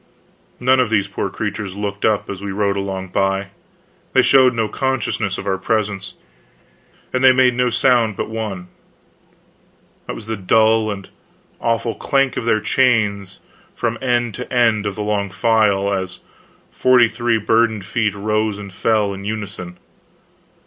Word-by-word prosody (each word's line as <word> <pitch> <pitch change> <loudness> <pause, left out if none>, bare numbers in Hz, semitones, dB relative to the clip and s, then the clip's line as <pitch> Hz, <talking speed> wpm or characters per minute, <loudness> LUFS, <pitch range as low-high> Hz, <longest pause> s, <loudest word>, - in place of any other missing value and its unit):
None 130 +1 +3
of 125 -3 +2
these 100 -3 +1
poor 100 - -3
creatures 100 -3 -4
looked 100 -1 -3
up 105 -2 +1
as 100 -1 -6
we 100 0 -4
rode 100 0 0
along 95 -1 -4
by; 95 +1 0 0.6
they - - +5
showed 130 -2 +5
no 110 -1 0
consciousness 110 -5 -2
of - - -6
our 95 -1 -1
presence. 100 -1 -2 1.0
And 130 0 0
they 130 - +8
made 130 -1 +4
no 125 +1 +1
sound 120 -2 +2
but - - -2
one; 105 -5 -5 1.4
that - - -4
was 110 - -9
the 110 0 -3
dull 110 +3 +3
and 100 -2 -6 0.5
awful 115 0 0
clank 135 +1 0
of - - -3
their 110 -2 +2
chains 105 -6 +1 0.3
from 115 -1 -2
end 120 -3 0
to 125 - -7
end 115 -4 +2
of 100 - -4
the 105 - -3
long 105 -1 -1
file, 100 -2 +2
as 95 -1 -4 0.5
forty 125 -2 +4
three 120 0 0
burdened 110 -1 +1
feet 110 -1 -1
rose 105 0 -1
and 100 -2 -9
fell 105 0 +1
in 100 0 -8
unison. 100 -4 -6
110 Hz, 155 wpm, -19 LUFS, 100-115 Hz, 1.4 s, they